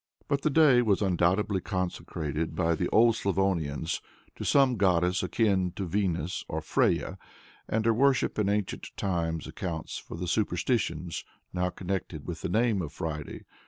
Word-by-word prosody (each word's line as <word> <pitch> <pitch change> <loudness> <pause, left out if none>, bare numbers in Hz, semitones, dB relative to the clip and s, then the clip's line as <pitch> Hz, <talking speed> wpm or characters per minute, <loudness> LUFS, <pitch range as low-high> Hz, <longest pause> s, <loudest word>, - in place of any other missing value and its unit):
But 140 0 0
the 155 - +2
day 145 -4 +6
was 105 -3 +2
undoubtedly 95 +2 +2
consecrated 80 -4 -3
by 85 -2 +2
the 90 +2 -1
old 115 0 +5
Slavonians 85 -6 0 0.3
to - - -6
some 135 -3 +4
goddess 90 -2 +2
akin 95 -2 +1
to 100 - -4
Venus 90 -2 -1
or - - -2
Freyja, - - 0 0.5
and 110 0 0
her 115 - +4
worship 135 -1 +2
in 100 -1 +2
ancient 105 -2 -1
times 85 -4 -1
accounts 85 -4 -5
for - - -9
the 90 +1 -4
superstitions 90 -3 -1 0.3
now 90 0 0
connected 95 +1 -4
with - - -5
the - - -2
name 110 -3 +2
of 80 -4 -5
Friday. 75 -2 -5
95 Hz, 155 wpm, -28 LUFS, 85-105 Hz, 0.5 s, day